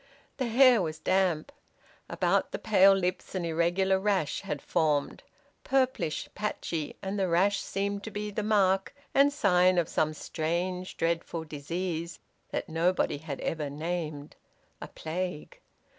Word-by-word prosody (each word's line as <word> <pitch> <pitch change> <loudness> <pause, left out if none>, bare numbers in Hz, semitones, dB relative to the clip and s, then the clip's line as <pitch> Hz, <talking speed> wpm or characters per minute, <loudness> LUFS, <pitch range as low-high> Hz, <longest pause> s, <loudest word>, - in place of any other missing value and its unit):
The 255 - -1
hair 245 -1 +6
was 160 -2 -3
damp. 185 - +1 0.6
About - - +1
the - - -3
pale 195 -2 +5
lips 185 0 -2
an 180 -2 -1
irregular 175 +4 +2
rash 195 -6 0
had 150 -2 -4
formed, 150 -1 0 0.4
purplish, 260 - 0
patchy, 170 -7 -3
and 195 +1 -2
the 190 - +1
rash 190 +4 +3
seemed 200 +1 -3
to - - -4
be 210 0 -4
the 210 - -2
mark 195 +1 +2 0.2
and 280 +1 +5
sign 185 -8 +3
of 170 -3 +2
some 155 0 0
strange 175 +4 -3
dreadful 165 0 -1
disease 165 +3 -4 0.3
that - - -3
nobody 165 -1 +1
had 145 -3 -6
ever 155 -3 -2
named: 155 -1 -4 0.5
a - - -6
plague. 175 0 -5
180 Hz, 140 wpm, -29 LUFS, 160-200 Hz, 0.6 s, hair